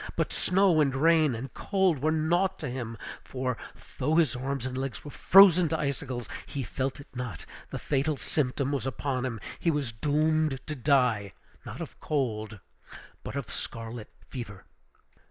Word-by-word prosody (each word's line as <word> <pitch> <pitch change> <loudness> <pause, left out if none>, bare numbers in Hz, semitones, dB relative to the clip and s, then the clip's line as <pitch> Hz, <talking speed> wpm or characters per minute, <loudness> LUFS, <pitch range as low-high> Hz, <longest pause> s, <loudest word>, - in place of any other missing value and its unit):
But - - -1
snow, 185 -4 +3
and 135 -3 +2
rain, 155 -2 +4
and 130 +4 -6
cold 190 -7 +1
were 155 +2 +2
naught 175 +5 +1
to - - -4
him; 115 -3 -5 0.3
for, 130 -1 -2 0.4
though 150 +5 +2
his 160 -8 +3
arms 130 +1 -3
and 130 -1 -3
legs 135 +1 -4
were 145 - -7
frozen 180 -1 +7
to 160 +1 0
icicles, 135 -4 -3 0.2
he 140 - -4
felt 130 +4 -3
it 140 - -14
not; 125 -5 -5 0.2
the - - -4
fatal 145 +1 0
symptom 135 +2 -1
was 135 -3 -1
upon 130 +1 -2
him; 115 -3 -5 0.2
he 170 - +1
was 145 -6 0
doomed 150 +3 +1
to 155 - -4
die, 125 -7 +2 0.3
not - - -7
of - - -8
cold, 110 -7 -2 0.6
but - - -7
of 140 -5 -4
scarlet 115 -1 -5 0.2
fever! 105 -7 -7
135 Hz, 165 wpm, -28 LUFS, 125-155 Hz, 0.6 s, frozen